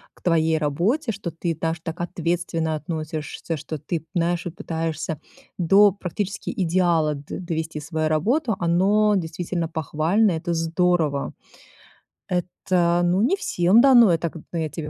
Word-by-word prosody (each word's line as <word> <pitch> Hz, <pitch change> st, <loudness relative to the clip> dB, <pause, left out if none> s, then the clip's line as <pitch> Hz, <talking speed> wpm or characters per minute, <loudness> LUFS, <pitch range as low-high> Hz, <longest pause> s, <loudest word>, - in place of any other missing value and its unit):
к -, -, -23 dB
твоей 160 Hz, -2 st, +2 dB
работе, 180 Hz, -, 0 dB
что 200 Hz, -4 st, -5 dB
ты 165 Hz, +1 st, -3 dB
даже 165 Hz, +1 st, -2 dB
так 165 Hz, 0 st, -5 dB
ответственно 170 Hz, -2 st, -2 dB
относишься, 155 Hz, 0 st, -4 dB
что 155 Hz, +2 st, -6 dB
ты, 155 Hz, +3 st, -4 dB
знаешь, 175 Hz, +1 st, 0 dB
и -, -, -2 dB
пытаешься 160 Hz, -2 st, -4 dB, 0.4 s
до 195 Hz, +4 st, +6 dB
практически 200 Hz, +2 st, -4 dB
идеала 170 Hz, -4 st, +1 dB
д 140 Hz, 0 st, -7 dB
довести 160 Hz, -3 st, -4 dB
свою 155 Hz, +1 st, -2 dB
работу. 225 Hz, -, +1 dB
Оно 195 Hz, +5 st, +3 dB
действительно 170 Hz, -1 st, -2 dB
похвально, 160 Hz, +6 st, +1 dB
это 170 Hz, +1 st, -2 dB
здорово. 165 Hz, -3 st, 0 dB, 0.9 s
Это, 175 Hz, -1 st, 0 dB
ну, 175 Hz, +2 st, +2 dB
не 270 Hz, +11 st, +3 dB
всем 200 Hz, -, +3 dB
дано, 240 Hz, -6 st, +7 dB
это, 165 Hz, 0 st, 0 dB
к -, -, -10 dB, 0.2 s
я 160 Hz, -2 st, -1 dB
тебе 150 Hz, -1 st, -6 dB
170 Hz, 140 wpm, -23 LUFS, 160-185 Hz, 0.9 s, дано